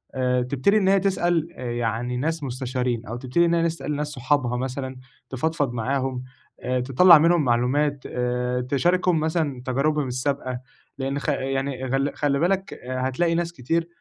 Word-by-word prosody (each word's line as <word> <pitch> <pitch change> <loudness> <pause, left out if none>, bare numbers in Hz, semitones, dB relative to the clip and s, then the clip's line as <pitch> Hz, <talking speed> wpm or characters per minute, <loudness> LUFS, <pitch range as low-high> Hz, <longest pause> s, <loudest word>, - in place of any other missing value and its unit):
آآ، 125 -1 +1
تبتدي 135 +11 +2
إن 195 -3 +2
هي 195 0 +5
تسأل 175 -4 +1
يعني 120 0 -2
ناس 160 +4 -2
مستشارين، 125 -2 -2
أو 110 +3 -5
تبتدي 130 +7 +1
إن 170 - +2
هي 170 - +3
نسأل 165 -3 -2
ناس 150 +1 -2
صحابها 130 -2 0
مثلًا، 130 +1 -4 0.3
تفضفض 145 0 -1
معاهم، 130 +2 -2 0.4
آآ، 125 0 0
تطلّع 140 +8 +7
منهم 165 +1 +4
معلومات، 135 +3 +1
آآ، 125 0 -1
تشاركهم 175 +7 +2
مثلًا 155 -4 -1
تجاربهم 140 +2 0
السابقة، 130 0 -2 0.4
لإن 135 +1 -2
خ 150 - -3
يعني 135 -1 -2
غل 135 +2 0
خلّي 140 -2 +1
بالك، 190 +4 0
آآ، 130 +1 -5
هتلاقي 165 +6 +1
ناس 170 0 -1
كتير 165 +4 -1
135 Hz, 160 wpm, -24 LUFS, 125-160 Hz, 0.4 s, تطلّع